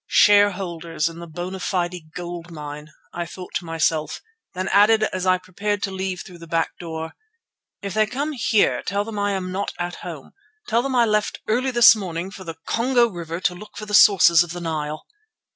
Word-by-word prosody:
"Shareholders 180 -6 +3
in 165 0 -10
the 170 - -8
Bona 175 +4 -6
Fide 175 -3 -3
Gold 175 -1 -6
Mine," 150 -2 -8 0.3
thought 175 +1 -6
I - - +2
to - - -13
myself, 160 -1 -1 0.4
then 185 0 -2
added 215 +2 +5
as 185 -3 -1
I 185 0 +4
prepared 200 +3 -3
to 195 - -1
leave 190 -1 -3
through 180 -2 -13
the 165 - -11
back 165 0 0
door: 160 -1 -6 0.7
"If 200 -2 -4
they 215 +1 +2
come 280 +6 -3
here 230 -6 +2
tell 200 +1 -1
them 210 -1 -6
I 205 0 0
am 185 -1 -3
not 195 +2 -3
at 175 0 -4
home. - - -9 0.4
Tell 230 +1 +2
them 265 0 -2
I 240 -1 +5
left 210 -1 0
early 250 +5 +1
this 240 -2 +7
morning 185 -2 -5
for 195 - -10
the 165 -2 -7
Congo 240 +1 +3
River 170 -3 -6
to 180 - +1
look 205 +4 -12
for 215 - -6
the 210 - -7
sources 185 -5 +7
of 175 -1 -3
the 175 - -6
Nile." 155 -2 -4
185 Hz, 200 wpm, -22 LUFS, 170-210 Hz, 0.7 s, this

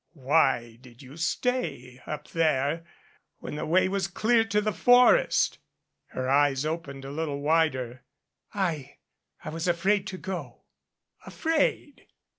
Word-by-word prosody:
"Why 130 -5 +1
did 125 0 -16
you 130 +2 -12
stay 165 - -2
up 150 -1 -6
there 155 -1 0 0.5
when - - -8
the 150 +1 -4
way 185 +4 +3
was 195 -1 -1
clear 225 +4 +2
to 210 -2 +1
the 210 0 -1
forest." 245 - +4 0.5
Her 130 0 -4
eyes 140 0 +2
opened 150 -4 -5
a 135 - -7
little 145 -1 -3
wider. 140 -6 0 0.5
"I 160 -9 -3 0.5
I - - -4
was 165 +2 -4
afraid 190 +3 +1
to 190 - -6
go." 185 -1 -7 0.6
"Afraid! 315 -3 -1
160 Hz, 130 wpm, -27 LUFS, 135-190 Hz, 0.6 s, forest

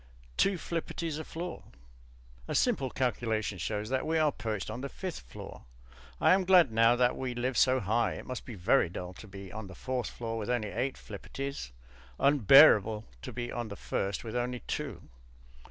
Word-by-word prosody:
Two 195 - +2
flipperties 165 -1 -3
a - - -4
floor. 175 +3 -6 0.9
(A - - -3
simple 200 - +2
calculation 110 -6 -1
shows 105 +3 -3
that 130 0 0
we 160 +1 +1
are 155 -2 +3
perched 110 -5 -4
on 115 +4 -5
the 140 - -4
fifth 185 +3 -5
floor. - - -11 0.5
I - - +6
am 190 0 +3
glad 180 -7 +6
now 115 +2 +5
that 125 0 +2
we 125 -2 -4
live 125 +1 -1
so 130 0 +4
high. 110 +1 +1
It - - -8
must 130 - -5
be 120 - -8
very 95 +2 +3
dull 90 +1 -6
to 110 - -12
be 95 -1 -10
on 110 -2 -6
the 95 - -11
fourth 130 -2 -3
floor 115 -1 -4
with 110 - -4
only 120 -4 0
eight 130 +5 -2
flipperties, 135 - -6 0.5
unbearable 110 -5 +6 0.2
to - - -6
be 120 0 -4
on 120 -1 -3
the 100 - -7
first 100 -1 -2
with 115 0 -6
only 125 0 -2
two.) 140 - -4
120 Hz, 185 wpm, -30 LUFS, 110-140 Hz, 0.9 s, I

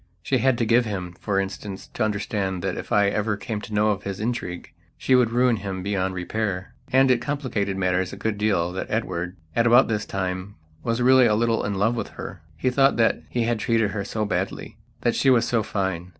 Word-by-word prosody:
She 130 +7 +1
had 130 +1 +3
to 115 - +1
give 120 +2 +4
him, 95 -5 -4
for 100 -2 0
instance, 95 0 -5
to 120 - -1
understand 100 -3 -2
that - - -1
if - - -7
I 100 -1 +4
ever 105 0 -1
came 105 0 -4
to - - -10
know 105 +1 +3
of 100 -1 -2
his 100 -1 -5
intrigue 105 -6 -4 0.3
she 130 - +1
would 125 -3 +5
ruin 120 0 +3
him 95 -2 -5
beyond 95 -1 -1
repair. 95 0 -3 0.2
And 130 0 +5
it 120 -2 +2
complicated 120 -9 -2
matters 90 -1 0
a - - -8
good 110 -2 -2
deal 95 -5 +1
that 95 - -5
Edward, 90 -5 -2 0.2
at 115 +1 +3
about 120 +2 +6
this 110 -1 -1
time, 95 +1 -3 0.3
was 115 +1 0
really 130 -1 +6
a 105 - +3
little 115 +1 +1
in 100 0 -2
love 105 +5 +1
with - - -3
her. 90 -1 -7 0.2
He 130 - +1
thought 135 +1 +3
that 115 - +2
he 120 - 0
had 115 -1 0
treated 115 -2 +1
her 100 -1 -3
so 110 +2 -2
badly; - - -3 0.3
that 120 - +2
she 135 - +2
was 120 -2 +4
so 115 -2 +2
fine. 95 -4 -2
105 Hz, 220 wpm, -24 LUFS, 95-120 Hz, 0.3 s, about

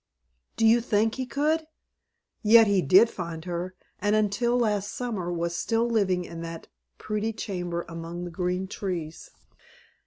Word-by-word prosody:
Do 225 - +3
you 230 +2 +6
think 220 -1 +1
he 260 -1 -4
could? 310 +4 0 0.7
Yet 225 +1 +7
he 200 -3 +3
did 190 +9 +6
find 170 -6 -6
her, 180 +1 -4 0.2
and 210 +1 +2
until 215 +3 +1
last 210 -4 0
summer, 210 -8 -3
was 170 0 -2
still 230 +5 0
living 190 -6 +1
in 165 -1 -8
that 165 -1 -7 0.3
pretty 215 +1 -2
chamber 175 -5 -4
among 170 +1 -6
the 175 - -7
green 180 +2 -2
trees. 175 -5 -5
200 Hz, 150 wpm, -26 LUFS, 175-225 Hz, 0.7 s, Yet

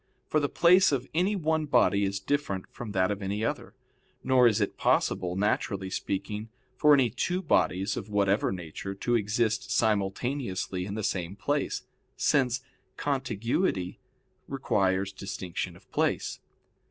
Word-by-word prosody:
For 155 - +1
the 145 -1 0
place 180 +1 +5
of 135 -2 -1
any 185 +6 +2
one 160 -3 0
body 105 -6 +3
is 100 0 -2
different 100 -7 -1
from 115 -3 -7
that 95 0 +2
of 105 0 -3
any 100 +3 -2
other, - - -4 0.5
nor 125 -2 +5
is 105 -3 +2
it - - -1
possible, 90 -1 +1
naturally 100 -1 -1
speaking, 105 +3 -3 0.3
for 150 +3 +6
any 130 -5 +3
two 180 - -1
bodies 100 - +1
of 100 - -6
whatever 100 0 +2
nature, 90 +2 -6
to 120 +5 -1
exist 110 +1 0
simultaneously 100 -2 0
in 100 - -4
the 110 - -3
same 95 -1 -2
place; 145 +7 -1 0.3
since 125 -3 +2 0.4
contiguity 120 - -1 0.5
requires 95 -7 0
distinction 95 -2 -5
of - - -19
place. - - 0
105 Hz, 140 wpm, -28 LUFS, 95-135 Hz, 0.5 s, for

